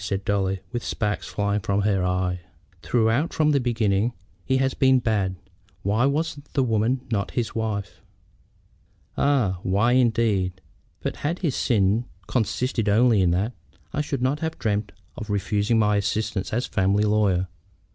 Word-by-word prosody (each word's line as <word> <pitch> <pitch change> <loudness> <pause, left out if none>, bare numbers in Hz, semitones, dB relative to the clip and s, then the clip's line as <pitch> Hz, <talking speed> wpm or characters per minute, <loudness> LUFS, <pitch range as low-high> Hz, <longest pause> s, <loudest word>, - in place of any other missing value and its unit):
said 100 0 -3
Dolly, 95 -2 0
with 120 -1 -3
sparks 105 -2 -2
flying 100 0 -1
from 100 0 0
her 100 -3 +1
eye. 90 0 0 0.4
"Throughout 120 +6 +1
from 155 -1 +3
the 140 - +3
beginning 115 -2 +1 0.3
he 130 - +1
has 135 0 +1
been 130 -1 +4
bad. 105 -6 0 0.5
Why 110 +7 +2
was 145 +1 -1
the 135 - +2
woman 115 +2 +1
not 100 -3 0
his 115 -3 -1
wife?" 105 -4 -3 1.1
"Ah! 120 -11 +2
why, 100 +6 +2
indeed. 110 -7 +2 0.4
But - - -3
had 160 +5 -2
his 145 - 0
sin 105 +1 +2 0.2
consisted 120 -1 0
only 110 0 +4
in 90 - +3
that, 95 +8 0 0.4
I 150 - 0
should 140 -4 -3
not 135 +3 +1
have 160 0 -3
dreamed 105 -2 -1 0.2
of 110 -2 -7
refusing 105 +2 +1
my 105 -1 +3
assistance 105 -1 -1
as 120 +3 0
a - - -10
family 100 +2 +2
lawyer. 105 -4 +2
110 Hz, 155 wpm, -24 LUFS, 100-125 Hz, 1.1 s, been